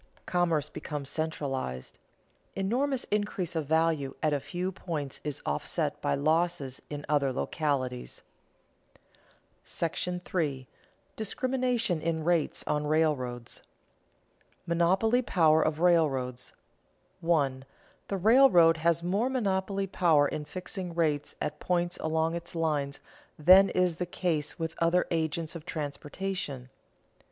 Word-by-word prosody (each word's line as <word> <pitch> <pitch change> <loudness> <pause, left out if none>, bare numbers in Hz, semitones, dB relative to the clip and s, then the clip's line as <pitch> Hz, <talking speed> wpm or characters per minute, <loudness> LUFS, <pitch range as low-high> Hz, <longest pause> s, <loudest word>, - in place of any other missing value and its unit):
Commerce 170 -4 +1
becomes 145 -2 -5
centralized. 135 - -3 0.6
Enormous 245 +7 0
increase 205 -5 -1
of 155 -3 -2
value 160 -3 +1
at 155 -1 +2
a 145 - +1
few 180 +6 -3
points 155 -7 -5
is 145 -1 -5
offset 75 0 -2
by 70 - +1
losses 155 -3 0
in 145 0 -6
other 145 -3 +2
localities. 130 -3 -2 1.4
§ 180 +2 -2
III. 135 -4 -3 0.5
DISCRIMINATION 245 -4 -1
IN 160 -1 -1
RATES 170 -2 +1
ON 150 0 -1
RAILROADS 135 -6 0
[Sidenote: - - -13 1.0
Monopoly 190 +8 +2
power 160 -8 +4
of 155 0 0
railroads] 135 -8 +1 0.7
1. 140 -6 +1 0.5
_The 195 -3 -3
railroad 215 - +7
has 170 +1 +1
more 200 +8 +1
monopoly 195 -5 0
power 165 -6 +3
in 150 +1 -4
fixing 180 +2 -6
rates 150 -4 0
at 150 - -3
points 175 -1 0
along 160 +1 0
its 170 0 -6
lines 150 -4 -1 0.4
than 185 +5 +7
is 180 -3 +1
the 180 - -2
case 165 -4 -2
with 165 -1 -3
other 170 +2 +3
agents 160 0 -1
of 165 - -7
transportation. 150 -2 -4
165 Hz, 120 wpm, -29 LUFS, 145-180 Hz, 1.4 s, railroad